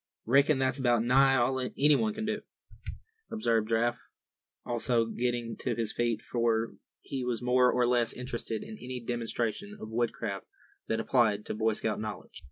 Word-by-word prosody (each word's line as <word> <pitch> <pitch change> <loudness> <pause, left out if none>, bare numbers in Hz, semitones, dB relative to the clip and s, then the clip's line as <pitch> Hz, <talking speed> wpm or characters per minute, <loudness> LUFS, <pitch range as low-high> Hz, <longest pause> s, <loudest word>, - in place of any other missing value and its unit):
"Reckon 140 +4 +4
that's 130 0 0
about 120 -3 +3
nigh 135 +2 +5
all 130 +1 +2
anybody 150 - +2
can 220 0 -3
do," 215 0 -2 0.9
observed 115 - 0
Giraffe, 120 +1 +1 0.6
also 120 -1 +1
getting 120 0 -2
to 120 -3 -2
his 115 -2 -2
feet; 120 -1 0
for 115 -1 0 0.3
he 135 -2 -4
was 125 -1 -2
more 125 0 +4
or 125 -1 +2
less 120 -2 +2
interested 120 -3 -4
in 110 - -9
any 125 0 -5
demonstration 120 - -3
of 110 - -7
woodcraft 110 -4 -2 0.4
that 110 - 0
applied 110 -3 +2
to - - -3
Boy 110 +1 +1
Scout 110 0 -1
knowledge. 110 -1 -6
120 Hz, 160 wpm, -30 LUFS, 115-130 Hz, 0.9 s, nigh